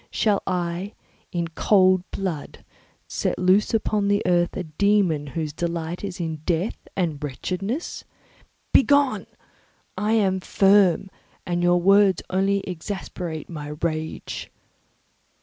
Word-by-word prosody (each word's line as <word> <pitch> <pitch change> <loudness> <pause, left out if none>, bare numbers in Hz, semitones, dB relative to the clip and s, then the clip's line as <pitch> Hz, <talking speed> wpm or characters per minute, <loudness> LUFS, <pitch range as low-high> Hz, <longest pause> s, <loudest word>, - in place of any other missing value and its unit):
Shall 210 -3 +1
I, 180 +2 -2 0.4
in 170 -2 -2
cool 185 +1 +4
blood, 180 -7 -5 0.4
set - - -2
loose 185 +3 +3
upon 215 -2 +1
the 205 +1 +2
earth 175 -1 +2
a 185 - -2
dæmon 170 -3 +1
whose 155 0 -3
delight 170 +1 -3
is 190 -3 -5
in 160 -2 -3
death 170 +6 -2
and 160 -6 -1
wretchedness? 185 - -4 0.7
Begone! 275 -6 +4 0.7
I 210 +1 0
am 195 -4 +2
firm, 195 -1 +3 0.3
and 175 0 -1
your 175 0 +4
words 195 0 +4
will 185 - 0
only 200 +1 +2
exasperate 175 -3 -5
my 150 -3 -6
rage." 160 -1 -3
180 Hz, 120 wpm, -24 LUFS, 165-200 Hz, 0.7 s, cool